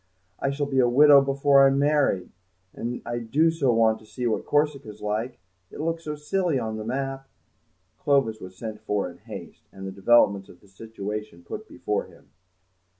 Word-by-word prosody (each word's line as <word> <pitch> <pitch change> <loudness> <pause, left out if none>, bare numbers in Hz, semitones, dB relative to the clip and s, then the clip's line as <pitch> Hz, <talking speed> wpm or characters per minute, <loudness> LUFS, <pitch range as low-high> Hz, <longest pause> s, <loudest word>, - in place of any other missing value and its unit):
I 140 - 0
shall 140 +1 -1
be 135 -2 0
a 120 -1 +4
widow 140 +2 +7
before 140 0 +4
I'm 135 0 +2
married, 145 -10 +1 0.4
and 120 +1 -5
I 120 0 -3
do 145 +8 +2
so 145 -6 +1
want 115 -1 +3
to 110 - -18
see 125 +3 -5
what 115 - -1
Corsica's 145 -7 0
like; 110 +4 -3 0.3
it - - -11
looks 165 +1 -2
so 150 -1 -3
silly 155 +1 -1
on 110 -3 -3
the 110 - -5
map." 135 +3 -4 0.7
Clovis 135 -6 +1
was 95 0 -10
sent 110 -2 -7
for 105 -2 -1
in 85 - -17
haste, - - -11
and 95 0 -9
the 95 - -5
developments 100 -1 +3
of 90 - -15
the 100 - -22
situation 105 -2 -7
put - - -8
before - - -3
him. - - -20
120 Hz, 185 wpm, -25 LUFS, 110-140 Hz, 0.7 s, widow